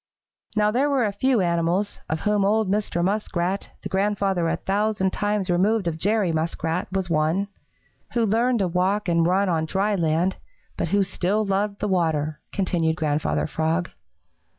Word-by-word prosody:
"Now 210 0 +3
there 265 +6 +2
were 270 -4 +2
a 205 - 0
few 250 +1 +2
animals, 170 +3 0
of 160 0 -2
whom 210 -1 +2
old 215 +1 +2
Mr. 200 -4 0
Muskrat, 190 -1 -1
the - - -3
grandfather 195 -3 0
a - - +1
thousand 200 -1 0
times 205 -2 -1
removed 195 +4 +2
of 160 -1 -2
Jerry 205 -1 +1
Muskrat, 165 +2 -2
was 190 -1 -1
one, 165 +5 +1 0.6
who 235 -2 +2
learned 235 +4 +2
to 190 - +1
walk 185 +4 0
and 170 -1 +3
run 195 +3 +2
on 165 -3 +1
dry 200 +5 0
land, 170 0 +1 0.4
but - - -2
who 200 0 +2
still 195 +3 0
loved 200 +1 -1
the 210 - 0
water," 160 -5 0
continued 170 -5 0
Grandfather 145 - 0
Frog. 160 - -1
190 Hz, 165 wpm, -24 LUFS, 170-210 Hz, 0.6 s, Now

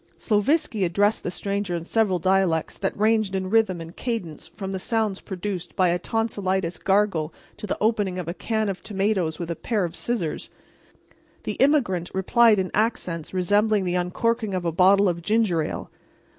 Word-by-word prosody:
Sloviski 225 - +1
addressed 205 +5 +2
the - - -3
stranger 200 0 -2
in 170 -1 -4
several 210 -2 +1
dialects 185 -2 +1
that 195 - -3
ranged 215 -2 +2
in 190 0 -2
rhythm 215 -6 +3
and 165 +1 -9
cadence 225 -11 -4
from 195 -2 -7
the 190 - -3
sounds 215 -1 -1
produced 185 -2 -5
by 185 -2 +3
a 175 +1 +1
tonsilitis 190 -5 -1
gargle 190 -6 +1 0.3
to 210 - -6
the - - -2
opening 205 -4 +1
of 180 -3 -4
a 170 - -2
can 220 +2 -1
of 190 -2 -3
tomatoes 195 -6 -1
with 170 -1 -4
a - - -2
pair 215 +1 -1
of 170 - -6
scissors. 210 -10 -3 0.9
The - - -3
immigrant 245 - +2
replied 225 +3 +4
in 185 -1 -1
accents 205 -7 -1
resembling 205 +3 +2
the 180 -1 -1
uncorking 200 +4 0
of 180 -1 -3
a 170 - +1
bottle 195 +4 +5
of 170 -1 -1
ginger 210 -3 +2
ale. 150 - -5
195 Hz, 175 wpm, -24 LUFS, 180-215 Hz, 0.9 s, bottle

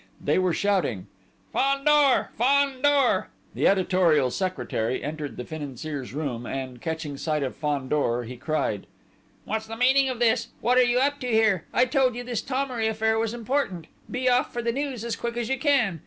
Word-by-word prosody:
They - - +1
were 185 -1 +2
shouting: 170 - 0 0.5
"Fandor! 275 0 +3
Fandor!" 275 +2 +3 0.3
The - - +2
editorial 180 -8 +3
secretary 130 - -2
entered 150 -4 -5
the 125 - -5
Financier's 145 -2 -6
room, 125 -5 -4
and, 130 -2 -5
catching 160 -3 -4
sight 155 0 -1
of 130 - -3
Fandor, 140 -4 -1
he 125 +2 -8
cried: 130 -6 -2 0.6
"What's 220 0 -3
the 225 +1 -7
meaning 265 +2 +4
of 255 - -3
this? 230 0 +2
What 250 +2 +3
are - - +7
you 245 0 +2
up 285 +2 +1
to 250 - -4
here? 220 -6 +2
I 250 - +4
told 255 -1 +2
you 245 - -5
this 240 -3 -3
Thomery 255 -4 -1
affair 220 0 +1
was 225 -1 0
important.... 235 - -2 0.2
Be 255 +1 -2
off 250 0 +3
for 240 - -4
the 235 - +1
news 270 -4 -3
as 235 - -2
quick 235 0 -4
as 235 -2 -2
you 265 -1 0
can.... 240 - +2
220 Hz, 180 wpm, -25 LUFS, 150-255 Hz, 0.6 s, are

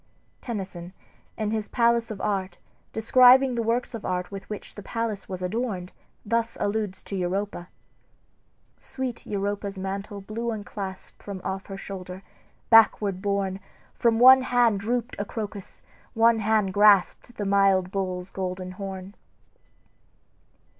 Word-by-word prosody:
Tennyson, 190 -6 -6 0.4
in 215 -1 -1
his 220 -1 -2
"Palace 235 0 +2
of 215 -3 -6
Art," 195 -2 -2 0.3
describing 255 +3 +6
the 235 - -1
works 235 +3 -1
of 230 - -6
art 180 0 -2
with 195 -1 -8
which 210 - -7
the 205 - -9
palace 220 -1 -4
was 185 -1 -5
adorned, 190 -2 -3 0.3
thus 230 +1 0
alludes 205 -2 -2
to 200 - -6
Europa: 185 0 -2 0.6
"... - - -41
sweet 260 -3 -5
Europa's 200 0 -3
mantle 195 +2 -5
blew 220 +4 -4
unclasped 200 -3 -6
From 200 -2 -6
off 190 0 -4
her 195 - -7
shoulder, 185 -1 -8 0.5
backward 210 -4 +5
borne, 200 -1 -1 0.3
From 230 -1 +2
one 260 +2 +9
hand 245 -5 +2
drooped 240 +3 -2
a - - 0
crocus, 205 -2 -7 0.3
one 230 0 +4
hand 215 -3 +1
grasped 205 +3 +4
The 205 - -2
mild 195 -2 +3
bull's 185 -2 -3
golden 185 -1 -4
horn." 190 0 -7
205 Hz, 135 wpm, -26 LUFS, 190-230 Hz, 0.6 s, one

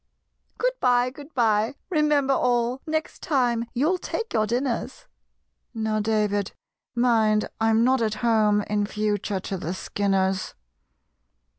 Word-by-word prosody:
"Good - - +1
bye! 245 0 +3
good 290 +2 -12
bye! 220 0 +2 0.2
remember 300 -4 +2
all, 245 0 +1
Next 315 0 -3
time 245 -7 +1
you'll 315 +9 +1
take 455 +5 -4
your 215 -1 +2
dinners! 245 - -2 0.7
(Now, 220 -1 -1
David, 210 -2 0 0.4
mind 225 -3 +3
I'm 225 0 +3
not 260 0 +3
at 215 -1 0
home 210 -2 +3
In 205 0 -1
future 210 -2 -1
to 195 - -4
the 175 +2 -4
Skinners!") 190 -1 -1
230 Hz, 125 wpm, -25 LUFS, 210-260 Hz, 0.7 s, bye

